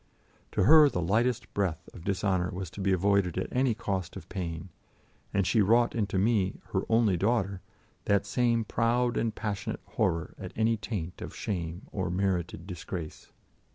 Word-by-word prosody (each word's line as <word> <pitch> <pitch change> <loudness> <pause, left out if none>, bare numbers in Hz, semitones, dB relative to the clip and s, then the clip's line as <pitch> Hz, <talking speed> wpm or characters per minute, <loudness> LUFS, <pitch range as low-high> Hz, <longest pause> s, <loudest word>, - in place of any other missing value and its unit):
To - - +2
her 150 +6 +8
the 105 - -2
lightest 110 +8 0
breath 90 -4 -1
of 85 - -11
dishonour 95 -1 0
was 90 -2 -5
to 100 - -7
be 95 0 +2
avoided 95 -1 +2
at 95 - -2
any 125 -2 +2
cost 95 -6 -3
of 95 - -9
pain, 85 -2 -4 0.6
and 100 -2 +1
she 110 +4 +3
wrought 115 +4 +4
into 100 -4 -1
me, 100 -2 +1
her - - +2
only 110 -5 +3
daughter, 100 -1 0 0.4
that 100 -1 +2
same 120 -2 +1
proud 120 +2 +1
and 115 -2 0
passionate 100 -3 -3
horror 85 -1 -1
at - - -7
any 115 +1 +2
taint 100 -5 -5
of - - -7
shame 85 -2 -4
or 95 -3 -2
merited 90 -2 -1
disgrace. 90 -3 -7
100 Hz, 165 wpm, -29 LUFS, 90-115 Hz, 0.6 s, her